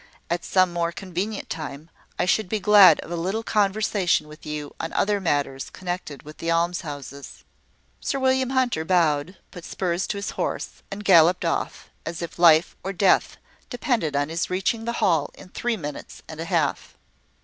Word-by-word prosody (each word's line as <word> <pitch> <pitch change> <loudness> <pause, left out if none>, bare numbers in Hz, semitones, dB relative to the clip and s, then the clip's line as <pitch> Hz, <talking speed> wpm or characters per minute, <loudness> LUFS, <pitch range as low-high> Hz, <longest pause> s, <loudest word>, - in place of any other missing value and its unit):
"At 170 0 -1
some 185 -2 +2
more 170 -1 0
convenient 190 +4 -4
time, 155 0 -7 0.3
I - - +1
should 185 +1 +1
be 215 - -1
glad 205 -2 +7
of - - -10
a - - -1
little 190 +7 -2
conversation 200 -6 +1
with 150 0 -13
you 150 -1 -5
on 165 - -4
other 205 0 +1
matters 145 -5 -1
connected 175 -5 -6
with 150 +1 -12
these 165 - -3
almshouses." 155 -5 -3 0.6
Sir 275 - -2
William 260 -1 +2
Hunter 255 -11 +1
bowed, 165 -1 +1
put 175 -3 -10
spurs 180 0 -2
to 205 - -3
his 200 - -4
horse, - - -4
and 205 +1 -7
galloped 175 -1 +5
off, 165 - -3
as 170 +1 -5
if 170 - -8
life 165 -1 +5
or 195 - -3
death 190 0 +2 0.3
depended 240 - -1
on 145 +1 0
his 165 +2 -2
reaching 195 +5 -1
the 235 - -2
Hall 160 -6 +2
in - - -14
three 235 +4 -2
minutes 145 -5 -8
and 160 -1 -9
a 165 - -3
half. 165 -6 -1
175 Hz, 175 wpm, -24 LUFS, 160-200 Hz, 0.6 s, glad